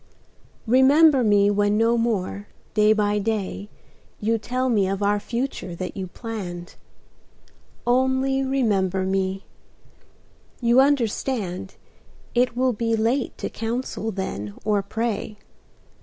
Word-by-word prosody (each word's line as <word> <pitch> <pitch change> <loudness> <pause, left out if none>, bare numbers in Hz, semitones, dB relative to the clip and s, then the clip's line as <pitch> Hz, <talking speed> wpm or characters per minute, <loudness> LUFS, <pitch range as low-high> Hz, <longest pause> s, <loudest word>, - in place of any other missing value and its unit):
Remember 265 +3 +5
me 205 -2 +4
when 205 0 +2
no 230 +1 +3
more, 205 -3 -1 0.3
day 210 0 +4
by 210 -1 +2
day, 205 -1 -3 0.5
You 225 +2 0
tell 255 +4 -2
me 210 -6 +2
of 195 +1 -2
our 205 +1 +2
future 235 -5 -4
that 185 +1 -5
you 190 -2 -4
planned: 180 -5 -7 1.1
Only 260 +2 +2
remember 205 -9 +1
me; 190 0 -1 1.1
you 235 +1 +4
understand 230 -8 -1 0.6
It 245 0 +1
will 255 0 +2
be 230 +1 0
late 235 +4 0
to - - -3
counsel 230 0 -3
then 145 - -5
or 210 -2 +2
pray. 215 0 -3
220 Hz, 115 wpm, -23 LUFS, 200-245 Hz, 1.1 s, Remember